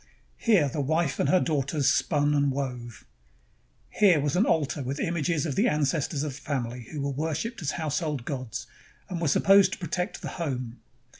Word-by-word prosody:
Here 200 -11 +4
the 145 +2 -2
wife 160 +1 0
and 140 - +2
her 185 - +5
daughters 145 -2 0
spun 150 -2 +2
and 140 -1 +2
wove. 125 -4 -5 0.9
Here 185 -7 +4
was 145 +1 0
an 195 +5 +3
altar 145 -2 +1
with 135 +2 -4
im 175 -4 -1
ages 160 0 0
of 150 - -2
the - - +2
ancestors 150 0 0
of 150 -3 -3
the 145 - -11
family 125 -4 -3
who 150 - -4
were 140 0 -1
worshiped 160 - -3
as 150 - -2
household 150 -4 -2
gods, 130 -6 -4 0.4
and 175 -2 -4
were 165 - +1
supposed 195 +7 +5
to - - -4
protect 180 +3 -3
the - - -3
home. 125 -6 -4
145 Hz, 190 wpm, -27 LUFS, 135-165 Hz, 0.9 s, her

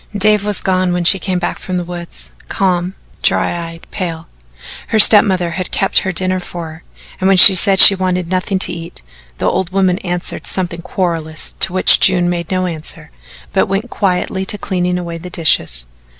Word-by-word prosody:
Dave 210 0 +3
was 210 -1 0
gone 185 -1 0
when 175 0 -2
she 190 +3 +4
came 185 0 -3
back - - -4
from 185 -1 -5
the 175 - -3
woods 175 0 -10 0.2
calm, 185 -1 -1 0.3
dry 170 -1 -1
eyed, 165 0 -13
pale. 165 -4 -6 0.6
Her 220 - -1
step 210 0 +8
mother 185 -5 -2
had 180 +1 -5
kept 195 - 0
her 190 - -4
dinner 185 +1 -2
for 175 -2 -8
her, 160 +2 -15 0.4
and 185 - 0
when 195 -1 +3
she 190 +2 +10
said 190 +1 +3
she 195 - +9
wanted 185 -2 -2
nothing 185 +1 -1
to 185 - 0
eat, 165 - -10 0.3
the - - -4
old 190 -3 -1
woman 190 -1 0
answered 175 -1 -5
something 175 -2 -4
querulous 165 -4 -4
to - - +5
which 185 0 +5
June 180 -2 +3
made 170 -1 -5
no 185 -1 -1
answer, 160 - -7 0.4
but - - +1
went 195 +5 -4
quietly 190 -1 -2
to 200 +2 -3
cleaning 180 -2 -3
away 170 -1 -6
the 180 +2 -10
dishes. 80 - 0
180 Hz, 195 wpm, -14 LUFS, 170-190 Hz, 0.6 s, she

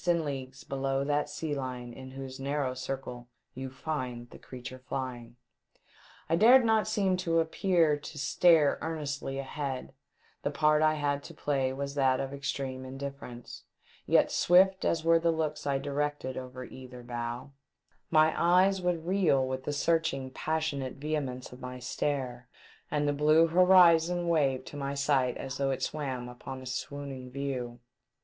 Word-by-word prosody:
451 165 -5 +1
and 130 -1 -6
leaofues 135 +2 -15
below 135 0 -1
that 145 +1 0
sea 150 +1 -3
line 125 -3 -5
in 130 +1 -10
whose 135 0 -8
narrow 140 -1 -1
circle 125 -2 -6 0.2
you 130 +1 -6
find 130 -3 -5
the - - -12
creature 130 0 -9
flying. 120 -3 -4 0.9
I 165 - +2
dared 240 +7 +7
not 220 -1 +3
seem 195 -4 +1
to 165 -2 +1
appear 165 -1 +2
to 150 +1 -10
stare 155 0 +4
earnestly 145 -4 -3
ahead, 135 -1 -4 0.5
the - - -1
part 150 +1 +3
I 155 0 +4
had 145 -1 -1
to - - -10
play 135 -3 0
was 140 +1 -4
that 130 -2 +2
of 135 0 -3
extreme 135 -2 -4
indifference; 135 -2 -8 0.4
yet, - - +4
swift 190 +2 +4
as 165 -1 +1
were 165 0 +5
the 170 +1 +1
looks 155 -2 -1
I 140 -1 +2
directed 145 -1 -2
over 130 0 -7
either 125 -1 -11
bow, 120 +2 -5 0.6
my 155 0 +5
eyes 185 +3 +4
would 175 -2 -1
reel 170 -8 +2
with 130 0 -4
the - - -1
searching, 145 -3 0
passionate 150 -3 -2
vehemence 140 -4 -3
of 125 - -12
my 125 0 -6
stare, 125 -1 -3 0.4
and 145 -1 0
the 145 - +2
blue 155 +3 +5
horizon 175 0 +5
wave 140 -6 +1
to - - -10
my 140 -1 -3
sight 140 -3 +1
as 135 +1 -5
though 135 -1 +1
it 135 - -2
swam 130 -5 -3
upon 125 +2 -8
a 130 - -10
swooning 130 0 -5
view. 125 -3 -4
140 Hz, 160 wpm, -30 LUFS, 130-160 Hz, 0.9 s, dared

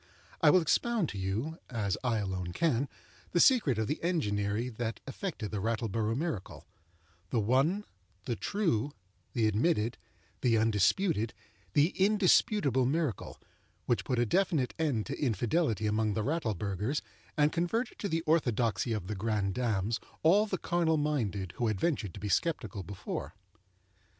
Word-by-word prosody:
I - - +7
will 180 +4 +6
expound 225 +2 +1
to 100 - -6
you—as 105 - -2
I 120 -3 +1
alone 95 -4 -3
can—the 125 - -2
secret 175 - +5
of 110 - +1
the 150 - -2
enginery 105 - 0
that 115 -2 -4
effected 135 - -4
the 105 - -2
Rattleborough 115 +1 -1
miracle—the 90 - -6
one, 135 - +2 0.4
the 120 - -1
true, 145 - 0 0.4
the 115 -3 +2
admitted, 110 +1 +1 0.4
the 115 -2 +3
undisputed, 115 - +2 0.4
the 150 +3 +4
indisputable 190 - +3
miracle, 150 - -2 0.5
which 115 -6 +1
put 125 +5 -1
a 120 - +3
definite 150 - +1
end 140 -10 0
to 140 - -5
infidelity 115 - +1
among 105 0 +1
the 110 - 0
Rattleburghers 110 - -1 0.3
and 150 0 +4
converted 175 +9 -1
to 200 - -2
the 165 -1 0
orthodoxy 120 -7 +1
of 105 -5 -3
the 105 - -3
grandames 105 +1 0 0.2
all 200 +7 +5
the 190 - -1
carnal 165 -2 +1
minded 110 - -1
who 120 - +1
had 105 -3 -1
ventured 115 - -1
to - - -7
be 105 - -4
sceptical 110 - -1
before. 95 +2 -6
120 Hz, 140 wpm, -31 LUFS, 105-160 Hz, 0.5 s, I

